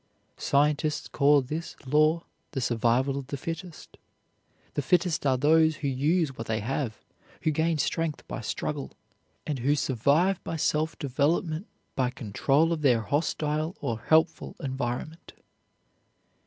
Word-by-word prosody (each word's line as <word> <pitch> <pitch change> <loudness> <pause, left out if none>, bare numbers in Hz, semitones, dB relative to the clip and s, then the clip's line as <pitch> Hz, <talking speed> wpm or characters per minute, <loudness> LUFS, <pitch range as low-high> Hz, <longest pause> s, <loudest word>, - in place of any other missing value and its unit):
Scientists 150 +1 +1
call 145 -1 +4
this 155 +6 -5
law 155 +4 +3 0.3
the 135 - -1
survival 120 +3 +1
of 135 - -9
the 140 - -4
fittest. 165 +3 -7 0.8
The - - 0
fittest 170 0 +1
are 130 -1 +3
those 155 +3 +4
who 145 -1 -3
use 145 +2 +1
what 115 - -6
they 110 -1 0
have, 120 +1 -2 0.5
who 155 - +2
gain 160 +2 +1
strength 160 +1 -2
by - - -5
struggle, 140 +5 -4 0.5
and 145 -4 -2
who 140 +5 +2
survive 145 - +2
by - - -4
self 155 +1 0
development 155 - 0 0.3
by 130 -2 +1
control 135 +7 +1
of 160 - -3
their 125 -6 +4
hostile 150 - -1
or 115 -1 -2
helpful 160 +5 +2
environment. 135 +3 -4
145 Hz, 135 wpm, -27 LUFS, 130-160 Hz, 0.8 s, call